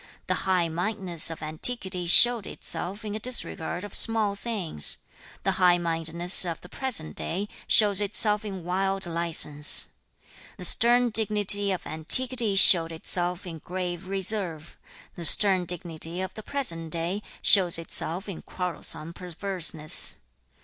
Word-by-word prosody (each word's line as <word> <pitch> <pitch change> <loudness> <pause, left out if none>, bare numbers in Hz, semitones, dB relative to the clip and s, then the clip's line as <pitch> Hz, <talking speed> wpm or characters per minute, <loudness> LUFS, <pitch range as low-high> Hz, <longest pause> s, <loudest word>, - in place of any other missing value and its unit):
2. - - -23 0.2
'The - - +1
high 185 -3 -2
mindedness 180 0 -2
of 165 -1 -10
antiquity 180 +3 -2
showed 235 +4 +4
itself 200 +5 -4
in 210 - -6
a 215 - -6
disregard 205 -7 -4
of 205 - -11
small 220 -3 +1
things; 200 - -1 0.5
the - - -1
high 180 -1 +3
mindedness 170 +1 +1
of 170 -3 -5
the - - -14
present 225 -9 -2
day 195 +4 -2 0.2
shows 205 -2 +2
itself 210 +1 -2
in 195 -4 -9
wild 190 +2 -3
license. 165 -3 +2 0.7
The 180 - -4
stern 240 +5 +4
dignity 205 -2 +4
of 185 - -6
antiquity 230 +7 +4
showed 170 -3 +7
itself 175 +3 -4
in 165 -3 -10
grave 180 +2 -7
reserve; 190 -5 -3 0.4
the 175 - -11
stern 185 +2 +5
dignity 170 -1 -4
of 190 0 -7
the 215 - -10
present 185 - -4
day 170 +5 -4 0.2
shows 180 -5 +3
itself 165 +3 -2
in 195 -5 -9
quarrelsome 170 -2 -5
perverseness. 175 -3 -1
180 Hz, 140 wpm, -24 LUFS, 170-205 Hz, 0.7 s, showed